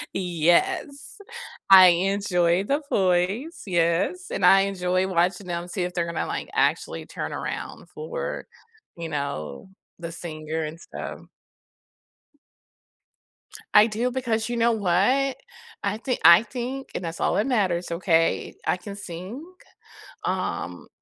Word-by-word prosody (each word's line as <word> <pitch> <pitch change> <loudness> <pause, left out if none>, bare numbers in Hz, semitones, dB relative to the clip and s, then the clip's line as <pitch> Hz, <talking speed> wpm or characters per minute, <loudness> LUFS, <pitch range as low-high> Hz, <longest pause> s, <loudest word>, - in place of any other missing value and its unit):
Yes, 190 - 0 0.5
I 185 -1 +11
enjoy 180 0 +2
The 285 +5 0
Voice, 195 - 0
yes, 175 - +1
and 190 - 0
I 195 +1 +7
enjoy 185 -1 0
watching 180 +1 0
them 175 0 -4
see 180 +1 -3
if 180 0 -3
they're 170 -1 0
gonna, 170 - -3
like, - - -4
actually - - 0
turn - - -5
around - - -6
for, 485 +1 -5 0.5
you 165 -1 -5
know, 140 - -5 0.3
the 170 -1 -6
singer 160 -1 -5
and 155 +2 -6
stuff. - - -8 2.5
I 210 +1 +7
do 235 +3 -1
because 230 -4 -1
you 240 - -2
know 235 0 +3
what, 220 +7 +2 0.5
I 200 +1 -1
thi 250 +2 -2
I 170 +5 +9
think 260 +2 -5
and - - -3
that's 165 -1 -5
all - - +1
that 210 - +1
matters, 185 -9 0
okay, 170 -1 +1
I - - +1
can 200 +2 -9
sing, 190 - -7 0.8
um, - - -3
185 Hz, 130 wpm, -24 LUFS, 170-230 Hz, 2.5 s, I